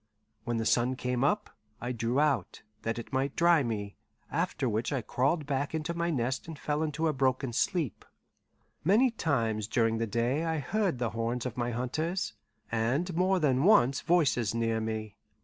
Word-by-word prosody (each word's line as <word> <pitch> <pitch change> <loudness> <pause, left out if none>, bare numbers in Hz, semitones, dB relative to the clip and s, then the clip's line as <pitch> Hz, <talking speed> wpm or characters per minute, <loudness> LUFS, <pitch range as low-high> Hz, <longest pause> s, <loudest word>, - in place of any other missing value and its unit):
When 120 -1 -1
the 115 - -1
sun 125 +3 +2
came 125 0 -1
up, 205 +9 +1 0.3
I 120 +1 -3
drew 120 +2 0
out, 150 -4 0 0.2
that 115 +1 -2
it 120 - -8
might 135 +1 0
dry 170 -2 +5
me; 105 -5 -3 0.3
after 130 - -1
which 110 +3 -1
I 135 -5 -1
crawled 140 +7 0
back 140 +2 -1
into 160 +2 -2
my 170 0 -1
nest 130 -3 -1
and 160 -2 -7
fell 150 +1 -1
into 160 +1 0
a 155 - +1
broken 130 -2 0
sleep. 160 - 0 0.8
Many 225 - +4
times 115 - 0
during 115 0 +1
the 115 - 0
day 120 +8 0
I 160 -1 0
heard 190 +1 0
the 120 -3 -1
horns 115 +2 -2
of 125 -3 -4
my 120 -1 -1
hunters, 155 +10 -2 0.4
and 130 +11 0
more 185 +2 +3
than 135 -4 +2
once 140 - +5
voices 135 - +2
near 115 -1 +1
me. 110 -1 -4
130 Hz, 180 wpm, -30 LUFS, 115-160 Hz, 0.8 s, dry